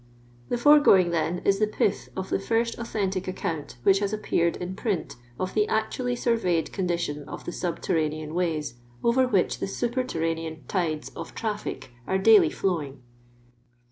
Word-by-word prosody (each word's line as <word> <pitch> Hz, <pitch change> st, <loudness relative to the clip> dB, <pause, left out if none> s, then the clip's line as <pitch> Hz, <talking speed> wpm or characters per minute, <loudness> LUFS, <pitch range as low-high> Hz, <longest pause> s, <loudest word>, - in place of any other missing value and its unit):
The -, -, 0 dB
foregoing, 240 Hz, -10 st, +6 dB
then, 170 Hz, +1 st, -1 dB
is 195 Hz, 0 st, +3 dB
the 215 Hz, -, +3 dB
piih 210 Hz, -2 st, -1 dB
of 190 Hz, 0 st, -4 dB
the -, -, +2 dB
fiift 230 Hz, +3 st, 0 dB
authentic 195 Hz, -5 st, -2 dB
account 160 Hz, -5 st, -4 dB
which 195 Hz, +5 st, +5 dB
has 200 Hz, -1 st, -1 dB
appeared 170 Hz, -5 st, 0 dB
in 180 Hz, +1 st, -5 dB
print 205 Hz, -5 st, -2 dB, 0.2 s
of 185 Hz, 0 st, -2 dB
the 210 Hz, -1 st, +2 dB
actually 245 Hz, +3 st, -1 dB
surveyed 225 Hz, -9 st, 0 dB
condition 170 Hz, -6 st, -2 dB
of -, -, -8 dB
the -, -, -4 dB
snbttf 175 Hz, -1 st, -3 dB
ranean 155 Hz, -1 st, -1 dB
ways, 160 Hz, -6 st, -1 dB, 0.3 s
over 255 Hz, +2 st, +3 dB
which 200 Hz, -7 st, +1 dB
the -, -, -2 dB
super 240 Hz, +5 st, -1 dB
terraiMn 165 Hz, -5 st, -3 dB
tides 160 Hz, -5 st, -1 dB
of -, -, -9 dB
traflic 210 Hz, -, -4 dB, 0.2 s
are 190 Hz, -, +1 dB
daily 215 Hz, +2 st, +6 dB
flowing. 150 Hz, -9 st, -2 dB
190 Hz, 160 wpm, -26 LUFS, 165-220 Hz, 0.3 s, foregoing